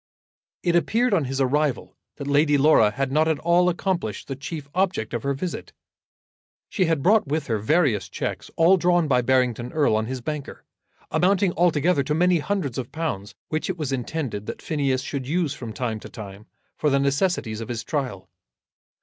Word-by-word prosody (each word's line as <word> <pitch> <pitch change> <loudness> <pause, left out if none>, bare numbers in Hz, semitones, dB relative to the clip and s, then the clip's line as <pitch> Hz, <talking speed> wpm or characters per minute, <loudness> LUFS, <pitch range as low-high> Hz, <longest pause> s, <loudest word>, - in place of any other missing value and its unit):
It 175 -1 +2
appeared 230 +7 +2
on 165 -7 +2
his 135 +1 -3
arrival 140 0 0 0.2
that 140 - -7
Lady 145 +1 +3
Laura 140 -7 +5
had 130 +4 -2
not 155 +3 +3
at 160 -2 +1
all 175 +3 +3
accomplished 175 - -2
the 135 - -4
chief 140 +2 -6
object 185 - 0
of 120 - -2
her 140 +2 -1
visit. 175 +6 -5 1.0
She 190 - +1
had 160 -4 0
brought 210 -3 +4
with 150 +1 -1
her 110 -2 -1
various 115 - +1
cheques, - - -4
all 170 +4 +5
drawn 175 -2 +2
by 125 -3 +3
Barrington 125 -1 +1
Erle 145 -8 +2
on 110 0 0
his 130 +1 -4
banker, 145 +3 -6 0.5
amounting 190 0 +2
altogether 170 -2 +2
to 150 +2 -1
many 180 +1 +3
hundreds 150 - -2
of 125 - -6
pounds, 145 -12 -4
which 155 +3 -2
it 185 - -2
was 150 -4 -3
intended 125 -5 -3
that - - -5
Phineas 135 -4 0
should 135 -3 -4
use 160 -1 0
from 120 -4 -7
time 115 -1 -3
to - - -10
time 105 0 -10 0.3
for 150 - +2
the 140 - +3
necessities 140 - 0
of 115 - -7
his 115 -2 -3
trial. 125 - -3
145 Hz, 185 wpm, -24 LUFS, 125-170 Hz, 1.0 s, Laura